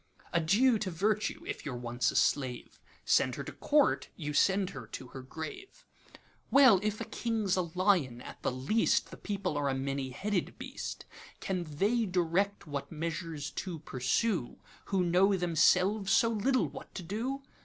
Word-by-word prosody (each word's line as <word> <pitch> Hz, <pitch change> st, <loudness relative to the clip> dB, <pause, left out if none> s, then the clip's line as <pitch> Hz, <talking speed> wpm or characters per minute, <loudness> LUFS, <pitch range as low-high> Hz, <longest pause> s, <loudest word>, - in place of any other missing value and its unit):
'Adieu 210 Hz, +9 st, +4 dB
to 205 Hz, -, -2 dB
Virtue, 205 Hz, +5 st, -1 dB
if -, -, -5 dB
you 145 Hz, -, -4 dB
're 125 Hz, -, -4 dB
once 120 Hz, +1 st, -1 dB
a -, -, -4 dB
slave:Send 130 Hz, -4 st, 0 dB
her -, -, -5 dB
to -, -, -7 dB
Court, 295 Hz, -1 st, +2 dB
you 150 Hz, -3 st, -4 dB
send 190 Hz, +4 st, +3 dB
her 125 Hz, -5 st, -8 dB
to 125 Hz, +2 st, -8 dB
her 135 Hz, -, -8 dB
grave. 380 Hz, -, -8 dB, 0.6 s
Well, 260 Hz, -8 st, +7 dB
if 215 Hz, 0 st, -1 dB
a -, -, -3 dB
King 225 Hz, -1 st, -2 dB
's 185 Hz, -, +3 dB
a 185 Hz, -, +2 dB
lion, 180 Hz, -11 st, +2 dB
at -, -, -10 dB
the -, -, 0 dB
leastThe 135 Hz, -, 0 dB
people 200 Hz, -5 st, -2 dB
are 140 Hz, -1 st, 0 dB
a 135 Hz, -, 0 dB
many 135 Hz, 0 st, -2 dB
headed 190 Hz, +8 st, -2 dB
beast; -, -, -6 dB, 0.3 s
Can 185 Hz, -3 st, -2 dB
they 205 Hz, +10 st, +1 dB
direct 185 Hz, +3 st, 0 dB
what 145 Hz, 0 st, -5 dB
measures 160 Hz, -1 st, -4 dB
to 180 Hz, -4 st, -5 dB
pursue, 145 Hz, -, -1 dB, 0.3 s
Who 195 Hz, -2 st, +1 dB
know 185 Hz, +3 st, +4 dB
themselves 180 Hz, +4 st, +3 dB
so 230 Hz, -, +5 dB
little 230 Hz, -, +1 dB
what 145 Hz, -, -11 dB
to 185 Hz, -, -5 dB
do? 245 Hz, +10 st, -3 dB
180 Hz, 165 wpm, -31 LUFS, 145-210 Hz, 0.6 s, Well